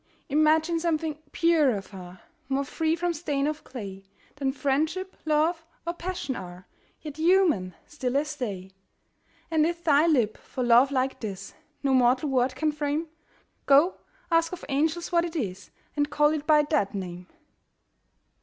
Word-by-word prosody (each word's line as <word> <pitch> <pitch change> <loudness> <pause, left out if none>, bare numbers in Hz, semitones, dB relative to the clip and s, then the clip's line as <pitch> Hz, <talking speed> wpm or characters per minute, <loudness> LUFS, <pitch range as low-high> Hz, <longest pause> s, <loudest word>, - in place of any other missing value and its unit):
Imagine 310 +3 +3
something 320 -2 -1
purer 310 -10 +3
far, 185 -2 -11 0.3
More 275 +1 +1
free 320 +3 0
from 345 0 -1
stain 290 -4 -1
of 305 +1 -3
clay 195 -6 -8 0.3
Than 270 -2 0
Friendship, 310 +7 -1
Love, 315 +2 +1 0.2
or 340 - -1
Passion 345 -7 -4
are, 180 -1 -9 0.4
Yet 300 -1 -8
human, 320 - +3
still 270 -3 -2
as 300 +1 -1
they: 195 -8 -5 0.8
And 315 -1 +3
if 340 +1 -1
thy 305 0 +4
lip, 240 -10 +2
for 255 - -5
love 240 +3 +6
like 265 -1 0
this, 195 -3 -6 0.3
No 270 -1 +2
mortal 255 +3 +3
word 255 -1 +1
can 310 -1 0
frame, 300 +2 -2 0.6
Go, 290 +7 +5 0.3
ask 330 0 +3
of 360 - -7
angels 315 +5 0
what 340 -1 +3
it 340 -1 -5
is, 195 - -4 0.3
And 290 -1 +1
call 295 0 +3
it 300 -1 -4
by 300 -1 +6
that 290 -10 0
name! 180 -2 -6
295 Hz, 155 wpm, -26 LUFS, 250-320 Hz, 0.8 s, love